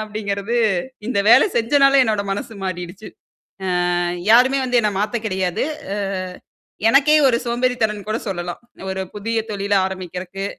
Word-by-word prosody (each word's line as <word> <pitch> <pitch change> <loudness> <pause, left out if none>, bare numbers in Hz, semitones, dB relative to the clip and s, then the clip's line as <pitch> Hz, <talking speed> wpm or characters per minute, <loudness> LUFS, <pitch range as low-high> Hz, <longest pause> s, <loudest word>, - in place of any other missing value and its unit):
அப்படிங்கிறது, 210 +1 -3 0.5
இந்த 230 -5 0
வேலை 235 - +7
செஞ்சனால 275 +4 +4
என்னோட 215 -3 0
மனசு 215 +3 -5
மாறிடுச்சு. 185 +3 -6 0.9
அ - - 0 0.3
யாருமே 260 +3 +5
வந்து 250 -1 +2
என்ன 210 - +1
மாத்த 215 +2 -1
கெடையாது. 185 -3 -1 0.3
அ 205 - -3 0.9
எனக்கே 280 +5 +5
ஒரு 235 -3 +3
சோம்பேறி 245 +1 0
தனம்னு 210 -2 -2
கூட 220 - 0
சொல்லலாம். 175 -2 -5 0.3
ஒரு 190 0 -3
புதிய 225 +3 -2
தொழில 200 0 -2
ஆரம்பிக்கிறதுக்கு. 185 +1 -6
210 Hz, 135 wpm, -20 LUFS, 190-240 Hz, 0.9 s, வேலை